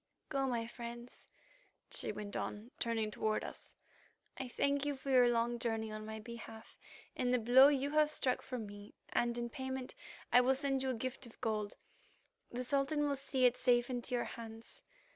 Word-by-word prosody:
"Go, 275 -2 +1
my 235 -3 0
friends," 235 +1 -9 0.6
she - - -2
went 205 -1 -6
on, 215 +4 -4
turning 225 -2 0
toward 215 0 0
us. - - -9 0.6
"I 265 - -4
thank 280 +3 +1
you 290 -1 0
for 270 +1 -4
your 250 -2 +7
long 235 0 +1
journey 225 -2 -1
on 215 0 -6
my 220 0 -5
behalf 225 0 -10 0.4
and 250 -1 +1
the 250 - +4
blow 245 +4 +8
you 285 -1 +1
have 305 0 +4
struck 265 -4 +1
for 255 - -5
me, 205 -2 -8
and 240 0 +1
in 240 0 -1
payment 260 +1 -4 0.4
I 245 - +9
will 260 +2 +3
send 270 -1 0
you 265 - 0
a 255 - 0
gift 255 +2 -4
of 230 - -16
gold; 215 -3 -1 0.8
the 245 +1 -3
Sultan 280 +3 +1
will 285 - +1
see 265 -1 +1
it 250 0 +4
safe 245 0 +3
into 245 0 -2
your 240 - +1
hands. 225 -1 -8
245 Hz, 185 wpm, -36 LUFS, 230-265 Hz, 0.8 s, I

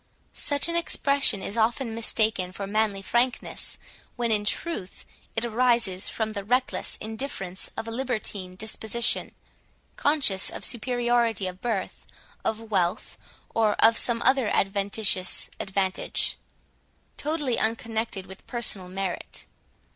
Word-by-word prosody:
Such 285 +1 +1
an 335 - -1
expression 280 - +2
is 205 - -4
often 230 +2 +1
mistaken 220 -4 +1
for 195 +1 -5
manly 205 -1 0
frankness, 240 +5 -1 0.4
when 235 -2 0
in 210 -1 +2
truth 215 - -3 0.3
it 225 +1 +1
arises 235 -5 +2
from 220 -1 -2
the 200 -2 -4
reckless 250 +5 +1
indifference 220 -5 -4
of 225 - -4
a - - -4
libertine 215 -7 -2
disposition, 220 +3 +1 0.7
conscious 280 -10 +3
of - - -2
superiority 240 -3 +1
of 185 0 -6
birth, 225 -6 -3 0.4
of 220 0 -3
wealth, 185 0 0 0.4
or 220 -2 +3
of 225 +1 +5
some 235 -1 +2
other 260 -2 +4
adventitious 195 -1 +1
advantage, 190 -1 0 0.8
totally 295 -5 -1
unconnected 220 -3 -1
with 190 0 -13
personal 210 -6 +1
merit. 190 -1 -4
220 Hz, 120 wpm, -26 LUFS, 195-240 Hz, 0.8 s, of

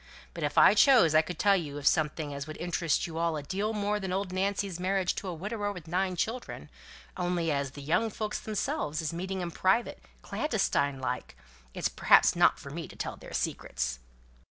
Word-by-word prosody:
But - - -5
if - - -2
I - - +8
chose, 240 - +6
I 155 - +6
could 170 +1 -7
tell 200 -1 +4
you 150 -6 -3
of 145 - -7
something 150 -1 +1
as 140 +1 -5
would 155 - -7
interest 170 -2 0
you 165 -1 -5
all 165 -2 0
a 145 - -5
deal 200 +8 -2
more 210 -1 -1
than 190 -2 -4
old 190 0 -2
Nancy's 195 -1 -1
marriage 185 0 +1
to 195 - -6
a 180 - -3
widower 205 +4 -3
with 180 -5 -9
nine 185 +2 0
children 225 +8 -4 0.5
only 175 -2 0
as 140 -2 -2
the 145 - -7
young 175 +10 +1
folks 215 0 -3
themselves 215 - -2
is 155 - -2
meeting 190 +2 -3
in 175 -1 -3
private, 190 +8 +1 0.2
clandestine 140 -1 0
like, 125 -1 -4 0.4
it's - - 0
perhaps - - +5
not - - +4
for - - -10
me - - -5
to - - -13
tell - - -4
their - - -12
secrets." - - -2
180 Hz, 200 wpm, -29 LUFS, 155-200 Hz, 0.5 s, I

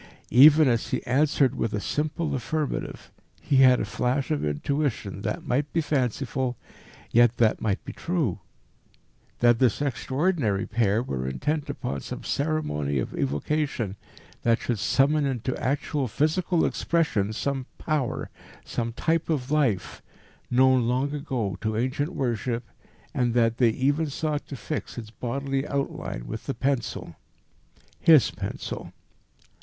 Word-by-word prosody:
Even 150 +4 +8
as 115 -2 +1
he - - -2
answered 140 0 +3
with 115 - -2
a - - -1
simple 150 +5 -2
affirmative, 150 +3 -3 0.3
he 140 - +1
had 130 -1 +7
a - - -1
flash 130 +4 -1
of 150 - 0
intuition 100 - -2
that 165 - -3
might 145 +2 0
be 170 - +1
fanciful, 130 -3 -1 0.5
yet 120 0 +5
that 110 -2 +3
might 105 -2 -1
be - - -6
true: 160 - -1 1.0
that 120 -1 +5
this 125 -5 +3
extraordinary 135 - 0
pair 110 0 +1
were 65 - -3
intent 145 - -2
upon 70 - -3
some - - -7
ceremony 140 - -1
of 60 - -2
evocation 100 - -1 0.5
that 115 0 +3
should 120 -4 -2
summon 140 +5 +3
into 130 -1 -2
actual 140 0 0
physical 160 - +1
expression 150 -12 0
some 135 +3 -2
Power 150 -6 -2 0.3
some 115 0 -3
type 165 +7 0
of 140 -4 -1
life 130 -12 0 0.5
known 130 -1 +4
long 130 +4 0
ago 125 - -3
to 110 0 -1
ancient 135 +7 -1
worship, 120 -1 -1 0.5
and 120 -2 0
that 115 -1 +3
they 120 -3 +5
even 145 +7 +1
sought 150 +1 -2
to 140 - -6
fix 145 +1 -5
its 110 -2 -7
bodily 135 +4 -2
outline 135 - -3
with - - -7
the - - -2
pencil 115 - -2 0.8
his 155 -5 +6
pencil. - - -6
130 Hz, 140 wpm, -26 LUFS, 115-145 Hz, 1.0 s, Even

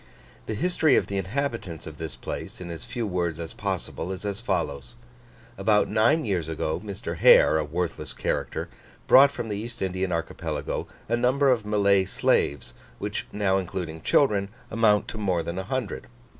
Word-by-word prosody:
The 110 - -2
history 160 - +3
of - - +3
the 100 - -3
inhabitants 100 - -3
of 80 -2 -9
this 80 -5 -5
place, - - -6
in 90 -1 -6
as 80 -2 -7
few 120 -1 -3
words 85 -4 -1
as 85 -1 -6
possible, 90 - -3
is 95 +2 -6
as 100 0 -2
follows. 70 - -2 0.6
About 105 +1 +3
nine 120 +8 +3
years 90 -7 -1
ago, 80 -1 -2
Mr. 100 -2 -5
Hare, 80 - +7
a - - 0
worthless 85 +3 -3
character, - - -2 0.4
brought 140 +2 +8
from 125 -4 -5
the 105 -2 -3
East 115 +3 -6
Indian 95 0 -1
archipelago 80 -2 -3 0.2
a 115 - +2
number 130 +3 +3
of 110 -4 0
Malay 100 -2 +3
slaves, 70 -6 0 0.2
which - - -4
now 100 -2 +1
including 85 -3 -5
children, 100 - +3 0.2
amount 105 -2 +3
to 110 - -6
more 90 -5 0
than 85 +3 -4
a - - -3
hundred. 130 - -3
100 Hz, 170 wpm, -26 LUFS, 85-115 Hz, 0.6 s, brought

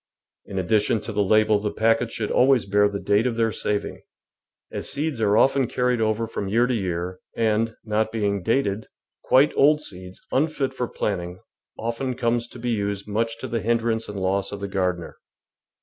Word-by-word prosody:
In 95 - -6
addition 105 +4 +2
to 115 - -6
the 105 -1 0
label 110 +1 +4
the 105 0 -2
packets 115 +2 +1
should 105 -2 -2
always 130 -2 +4
bear 105 +1 +3
the 100 0 -4
date 105 +5 +2
of 120 - -1
their 115 -1 +1
saving, 105 -1 -2 0.7
as - - -3
seeds 145 -4 -2
are 105 0 +3
often 135 0 +4
carried 125 -1 0
over 110 +1 +1
from 110 -3 -4
year 115 +5 +3
to 125 - 0
year, 90 -3 -3 0.2
and, 115 0 +1
not 110 0 0
being 100 -3 -1
dated, 110 -1 0 0.4
quite 135 +3 +4
old 150 +2 +5
seeds, 90 -9 -9
unfit 140 -1 0
for 125 -2 -2
planting, 90 -5 -3 0.4
often 120 +3 -3
comes 120 -1 0
to 125 - -12
be 120 0 -2
used 100 -2 -2
much 115 +2 -1
to - - -4
the 115 -1 -2
hindrance 115 -1 0
and 105 -1 -5
loss 95 +1 0
of 100 - -5
the 100 - -4
gardener. 90 -3 -2
110 Hz, 185 wpm, -24 LUFS, 100-120 Hz, 0.7 s, old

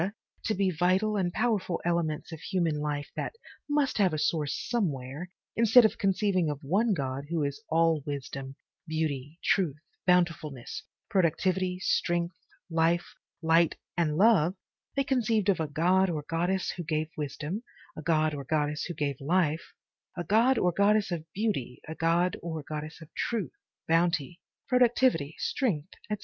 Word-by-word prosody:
to 220 - 0
be 190 -1 +2
vital 185 +5 +2
and 185 -3 +1
powerful 210 -5 0
elements 170 -2 -1
of 160 - -7
human 165 -4 0
life 145 -1 -2
that - - -3 0.4
must 290 -5 +1
have 190 -5 +4
a - - -2
source 150 -1 0
somewhere, 155 - -2 0.3
instead 230 +1 +7
of 220 - +1
conceiving 195 -3 +2
of 145 - -2
one 200 +11 +2
God 135 -1 -3
who 165 -3 0
is 140 +9 -3
all 165 -1 +3
wisdom, 140 -2 -5 0.3
beauty, 155 -2 -2
truth, 170 -8 +2 0.3
bountifulness, 170 -7 +1 0.3
productivity, 185 -1 +1
strength, 175 -1 0 0.3
life, 165 +1 +1 0.3
light 165 0 +4 0.2
and 160 -3 +1
love, 190 -4 +5 0.4
they 275 - +2
conceived 230 -6 +1
of 190 - +3
a 160 - 0
god 180 +6 +3
or 155 -3 -2
goddess 175 +3 0
who 175 - -4
gave 155 0 -1
wisdom, 155 +6 -4 0.4
a - - -5
god 155 0 +2
or 140 -1 -4
goddess 150 +1 0
who 175 - -5
gave 145 -3 -1
life, 160 +1 0 0.4
a 175 - -2
god 230 +8 +4
or 180 - +3
goddess 200 +2 +3
of 170 -3 -2
beauty, 195 - -2
a 160 - -4
god 170 +3 +2
or 160 -2 -4
goddess 155 +1 -5
of - - -14
truth, 210 - -2 0.4
bounty, 165 0 +1 0.3
productivity, 245 - +3
strength, 185 - -1 0.2
etc. 210 -1 -2
170 Hz, 155 wpm, -29 LUFS, 155-195 Hz, 0.4 s, instead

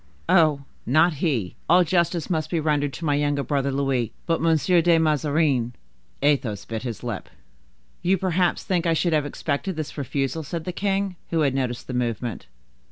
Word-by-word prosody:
"Oh, 160 -5 +4 0.2
not 155 +7 +4
he; 125 - -1
all 180 +2 +6
justice 170 -1 +1
must 160 -4 -1
be 170 - 0
rendered 145 -2 +1
to 165 - -6
my 145 - +2
younger 145 -1 +1
brother 140 +1 0
Louis; 135 -4 0
but 165 -2 0
Monsieur 165 +2 +3
de 170 0 +4
Mazarin—" 150 -5 +1 0.5
Athos 120 -9 +1
bit 110 -1 -4
his 120 -3 -6
lips. 120 -5 -5 0.7
"You 185 +2 +2
perhaps 180 -1 +1
think 180 -3 0
I 165 - +3
should 165 +1 +1
have 150 -2 +1
expected 155 +6 -3
this 155 -1 -5
refusal?" 140 +3 -2
said 160 +2 -5
the 180 - -3
king, 195 -1 -1
who 165 -1 +1
had 140 -3 +2
noticed 125 -3 -2
the 130 - -6
movement. 120 -3 -2
150 Hz, 175 wpm, -24 LUFS, 135-170 Hz, 0.7 s, all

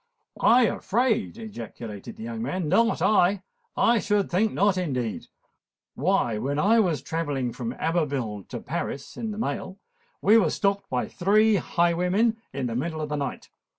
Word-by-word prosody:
"I 245 +2 +6
afraid!" 230 +1 0
ejaculated 115 - -8
the 220 - -9
young 230 -1 -5
man; 185 -7 -2
"not 230 +8 +2
I! 195 -2 +3 0.3
I 235 0 +4
should 205 -1 0
think 210 +5 +2
not, 200 0 +2
indeed! 130 - -2 0.7
Why, 140 - +1
when 140 +5 -2
I 215 +8 +4
was 175 -8 +1
travelling 145 -7 -2
from 120 -1 -4
Abbeville 135 - -2
to - - -5
Paris 140 - -5
in 225 - -4
the 210 - -5
mail, 190 -4 -3 0.4
we 215 +3 +5
were 180 -7 +2
stopped 200 +2 -1
by 125 -1 -1
three 210 +3 +3
highwaymen 180 +7 +1
in 135 -1 -3
the 115 -2 -3
middle 160 +5 -2
of 155 -1 -3
the 150 - -1
night. 140 -1 -4
180 Hz, 160 wpm, -26 LUFS, 140-215 Hz, 0.7 s, I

